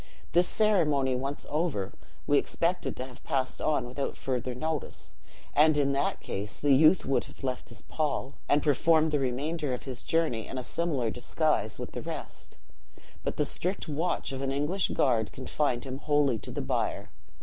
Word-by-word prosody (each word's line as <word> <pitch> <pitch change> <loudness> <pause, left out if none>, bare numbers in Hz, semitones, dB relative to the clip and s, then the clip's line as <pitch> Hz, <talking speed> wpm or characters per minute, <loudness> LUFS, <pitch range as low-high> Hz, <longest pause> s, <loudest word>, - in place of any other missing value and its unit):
This 175 +1 +4
ceremony 150 -12 +3
once 135 +3 -2
over, 150 - -1 0.3
we 145 - +5
expected 175 +2 -1
to 130 - -3
have 130 -2 -13
passed 130 -1 -1
on 155 -4 +1
without 130 +3 -3
further 125 -1 -2
notice; 155 +2 -3 0.4
and 150 +1 +5
in 140 -1 +3
that 140 +1 0
case 100 +2 -5
the 145 -1 +4
youth 155 +6 +6
would 135 - +1
have - - -15
left 130 -1 -3
his 115 - -10
pall, 145 -3 -2 0.2
and 145 0 +4
performed 155 +2 +4
the 150 - +2
remainder 140 +3 -1
of - - -9
his 130 -2 -6
journey 155 -10 +1
in 135 - -6
a 130 - -3
similar 140 -7 -1
disguise 125 -1 0
with - - -6
the - - -5
rest; - - -6 0.6
but - - -3
the 150 - +2
strict 180 +8 -1
watch 160 0 -1
of 135 0 -4
an 135 -1 -1
English 150 +8 +1
guard 115 -6 +2
confined 130 -1 -1
him 135 0 -5
wholly 145 -6 +2
to - - -8
the - - -3
bier. - - -1
140 Hz, 180 wpm, -29 LUFS, 130-155 Hz, 0.6 s, youth